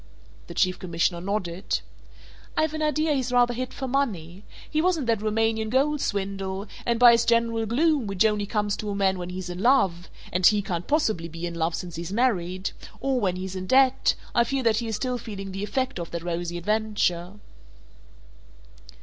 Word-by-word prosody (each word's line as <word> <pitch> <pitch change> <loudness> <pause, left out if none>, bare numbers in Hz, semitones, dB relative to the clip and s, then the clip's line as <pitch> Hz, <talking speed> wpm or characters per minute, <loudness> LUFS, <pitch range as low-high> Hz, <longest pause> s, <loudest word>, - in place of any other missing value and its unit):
The 170 - -9
Chief 185 0 +2
Commissioner 170 0 0
nodded. 190 -2 -2 0.8
"I've 310 0 +2
an 310 - -3
idea 305 0 +1
he's 260 -3 -1
rather 245 -1 +4
hit 255 +1 -4
for 265 - -5
money. 200 - -2 0.2
He 310 - 0
was 365 0 +2
in 290 - -3
that 225 -3 +1
Roumanian 220 0 0
gold 280 +4 +2
swindle, 195 -1 -2 0.2
and 235 -1 +1
by 245 -1 +9
his 235 0 +4
general 230 -1 +1
gloom, 285 +1 +2
which 195 +2 +2
only 210 -2 +1
comes 210 -1 0
to 210 - -4
a 200 - -2
man 190 -2 +1
when 175 0 -5
he's 185 0 -5
in 175 - -6
love 190 -7 +2 0.2
(and 180 +1 0
he 205 +2 +5
can't 175 -3 -3
possibly 220 - +1
be 165 +1 -6
in 170 - -4
love 165 0 -1
since 175 -2 -6
he's 170 +1 -5
married) 190 -5 0 0.3
or 270 -1 0
when 190 -5 0
he's 190 +1 -5
in 185 0 -5
debt, 265 +2 +4 0.2
I 235 - +4
fear 270 +2 -2
that 225 -2 +3
he 230 0 -2
is 220 - -2
still 250 +3 -2
feeling 195 -4 -7
the 195 +1 -4
effect 255 -1 -2
of 170 - -5
that 170 -1 -5
rosy 175 0 -3
adventure." 205 -2 0
210 Hz, 195 wpm, -25 LUFS, 180-245 Hz, 0.8 s, by